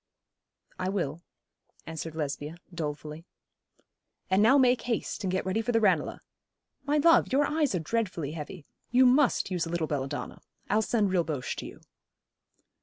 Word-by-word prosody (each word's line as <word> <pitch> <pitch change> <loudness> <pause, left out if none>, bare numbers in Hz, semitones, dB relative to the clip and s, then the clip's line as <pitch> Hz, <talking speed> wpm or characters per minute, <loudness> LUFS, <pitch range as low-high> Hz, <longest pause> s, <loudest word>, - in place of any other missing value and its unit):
'I 185 - -1
will,' 170 -5 -2 0.6
answered 160 0 -6
Lesbia, 150 +1 -4 0.2
dolefully. 150 -1 -5 1.1
'And 190 +2 +4
now 245 +6 +6
make 250 -2 +4
haste, 230 -2 -3
and 190 - 0
get 185 0 -1
ready 190 +4 0
for 245 - -1
the 225 - +3
Ranelagh. 185 -8 +1 0.6
My 290 +1 +2
love, 330 +3 +5
your 285 +2 +3
eyes 300 -8 +1
are - - +1
dreadfully 175 -4 -2
heavy. 155 +1 -7 0.2
You 255 +2 +5
must 255 -5 +3
use 175 -2 -1
a - - -6
little 170 -1 -1
belladonna. 140 -3 -4 0.3
I'll 215 - +4
send 215 -3 +1
Rilboche 160 -7 -1
to - - -5
you.' - - -12
185 Hz, 155 wpm, -28 LUFS, 160-235 Hz, 1.1 s, now